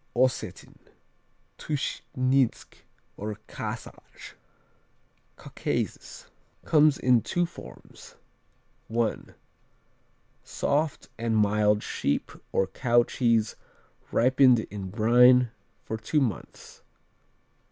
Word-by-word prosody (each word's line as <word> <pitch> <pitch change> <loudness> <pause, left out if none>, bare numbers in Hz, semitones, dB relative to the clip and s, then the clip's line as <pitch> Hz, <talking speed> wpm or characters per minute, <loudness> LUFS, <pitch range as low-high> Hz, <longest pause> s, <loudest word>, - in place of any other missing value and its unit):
Ossetin, 120 -6 -1 0.8
Tuschninsk, 135 -3 -1 0.4
or 105 +1 -5
Kasach - - -8 1.0
Caucasus - - -5 0.4
Comes 150 -2 +4
in 125 -2 +3
two 175 - 0
forms: 170 - -13 0.8
I. 115 -1 +1 1.3
Soft 150 +1 -1
and 115 -1 0
mild 105 0 +2
sheep 70 - -2 0.2
or 95 - +2
cow 120 +4 +2
cheese 115 -3 0 0.6
ripened 130 -1 +4
in 100 -2 -6
brine 120 +3 +5 0.3
for 110 - -4
two 110 +8 0
months. 115 - -5
120 Hz, 80 wpm, -27 LUFS, 110-130 Hz, 1.3 s, brine